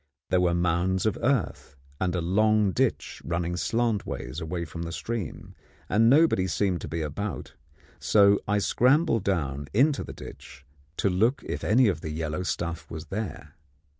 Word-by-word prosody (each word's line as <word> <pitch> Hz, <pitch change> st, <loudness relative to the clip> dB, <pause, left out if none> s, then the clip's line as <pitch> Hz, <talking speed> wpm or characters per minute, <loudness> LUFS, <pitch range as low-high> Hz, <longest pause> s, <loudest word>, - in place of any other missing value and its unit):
There 90 Hz, -, +3 dB
were 85 Hz, -1 st, +2 dB
mounds 90 Hz, +2 st, +1 dB
of 110 Hz, -, +1 dB
earth, 125 Hz, -, -1 dB, 0.2 s
and 95 Hz, -1 st, 0 dB
a 90 Hz, -, 0 dB
long 105 Hz, +3 st, +3 dB
ditch 130 Hz, +4 st, -1 dB
running 85 Hz, +1 st, -2 dB
slantwise 100 Hz, -, -2 dB
away 85 Hz, +1 st, -3 dB
from 85 Hz, +2 st, -8 dB
the 85 Hz, 0 st, -4 dB
stream, 110 Hz, +1 st, -5 dB, 0.4 s
and 115 Hz, +3 st, +4 dB
nobody 140 Hz, -, +4 dB
seemed 95 Hz, -3 st, 0 dB
to -, -, -6 dB
be 80 Hz, -1 st, -3 dB
about; 95 Hz, +7 st, -5 dB, 0.5 s
so 100 Hz, -1 st, +4 dB
I 105 Hz, +1 st, +2 dB
scrambled 125 Hz, -, +2 dB
down 70 Hz, -8 st, -1 dB
into 140 Hz, +4 st, +3 dB
the -, -, -8 dB
ditch 65 Hz, +2 st, -12 dB, 0.3 s
to -, -, +1 dB
look 115 Hz, +9 st, +1 dB
if -, -, -5 dB
any 120 Hz, +3 st, +4 dB
of 85 Hz, -6 st, -1 dB
the 80 Hz, -, -5 dB
yellow 80 Hz, +2 st, -3 dB
stuff 85 Hz, -4 st, -3 dB
was 80 Hz, -1 st, -8 dB
there. 105 Hz, +1 st, -5 dB
95 Hz, 165 wpm, -26 LUFS, 85-110 Hz, 0.5 s, and